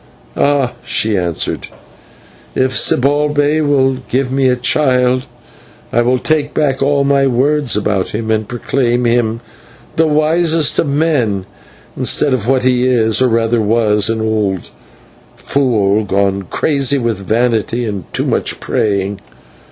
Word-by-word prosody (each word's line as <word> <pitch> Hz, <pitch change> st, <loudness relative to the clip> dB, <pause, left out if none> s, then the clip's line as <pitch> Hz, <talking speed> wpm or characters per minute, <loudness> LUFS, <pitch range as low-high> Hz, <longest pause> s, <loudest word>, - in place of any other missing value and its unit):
"Ah!" 140 Hz, -3 st, +1 dB
she 110 Hz, -1 st, -1 dB
answered, 85 Hz, -3 st, -2 dB, 0.9 s
"if 130 Hz, 0 st, +1 dB
Zibalbay 145 Hz, +3 st, +2 dB
will 135 Hz, -3 st, +2 dB
give 130 Hz, 0 st, -1 dB
me 135 Hz, 0 st, +2 dB
a 125 Hz, -, +2 dB
child 125 Hz, -1 st, +1 dB, 0.7 s
I 120 Hz, -, +3 dB
will 125 Hz, +2 st, +2 dB
take 150 Hz, +2 st, -1 dB
back 140 Hz, -3 st, 0 dB
all 140 Hz, 0 st, +2 dB
my 140 Hz, 0 st, +2 dB
words 135 Hz, 0 st, +1 dB
about 100 Hz, -2 st, -1 dB
him, 110 Hz, +1 st, -3 dB
and 110 Hz, -1 st, -1 dB
proclaim 120 Hz, 0 st, -1 dB
him 115 Hz, -1 st, 0 dB, 0.6 s
the 160 Hz, 0 st, +3 dB
wisest 155 Hz, +1 st, +1 dB
of -, -, +1 dB
men, 140 Hz, -, 0 dB, 0.5 s
instead 140 Hz, -, 0 dB
of 120 Hz, -3 st, -2 dB
what 130 Hz, -1 st, +2 dB
he 125 Hz, -1 st, +2 dB
is, 115 Hz, -2 st, +2 dB
or 130 Hz, -, +4 dB
rather 115 Hz, 0 st, +1 dB
was 105 Hz, -1 st, +1 dB
an 115 Hz, -1 st, -1 dB
old 105 Hz, -4 st, -2 dB, 0.6 s
fool 110 Hz, -7 st, +1 dB
gone 100 Hz, -1 st, 0 dB
crazy 140 Hz, -2 st, +1 dB
with 115 Hz, -5 st, -2 dB
vanity 115 Hz, +3 st, 0 dB
and 100 Hz, -6 st, -6 dB
too -, -, -1 dB
much -, -, -1 dB
praying. 100 Hz, -1 st, -1 dB
125 Hz, 135 wpm, -15 LUFS, 110-140 Hz, 0.9 s, or